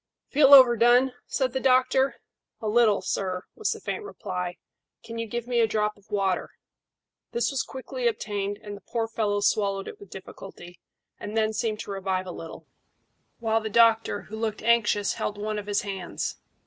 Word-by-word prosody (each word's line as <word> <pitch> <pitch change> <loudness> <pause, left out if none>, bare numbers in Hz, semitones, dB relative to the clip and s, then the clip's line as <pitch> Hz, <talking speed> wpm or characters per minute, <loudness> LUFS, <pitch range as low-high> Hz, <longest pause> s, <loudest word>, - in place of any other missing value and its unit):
"Feel 280 -1 +5
overdone?" 245 0 +6
said 260 -2 -1
the 265 - 0
doctor. 260 +1 +3 0.4
"A 220 - -4
little, 215 -1 +3
sir," 185 -2 -2
was 435 - -2
the - - -4
faint - - -4
reply. 180 - -5 0.5
"Can 230 0 -7
you 230 - -3
give 235 +1 -4
me 245 -1 0
a 225 - +4
drop 210 0 0
of 205 - -25
the - - -3
water?" 190 -2 0 0.8
This 475 -8 0
was 275 - 0
quickly 260 -1 -4
obtained, 205 -3 -2
and 205 -1 -7
the 200 - -13
poor 230 -2 -2
fellow 210 -2 -1
swallowed 200 -1 +1
it - - -9
with 200 - -13
difficulty, 185 -2 -11 0.4
and 210 +2 -5
then 220 0 +2
seemed 215 -1 -2
to - - -7
revive 190 -1 -2
a 180 - -6
little, 165 -1 -9 0.7
while 225 -1 0
the 220 - -4
doctor, 225 -1 +3
who 220 - -9
looked 220 -1 -3
anxious, 215 -3 +2
held 210 - -3
one 210 0 -3
of 205 - -9
his 205 0 0
hands. 195 -3 -4
215 Hz, 185 wpm, -26 LUFS, 200-235 Hz, 0.8 s, overdone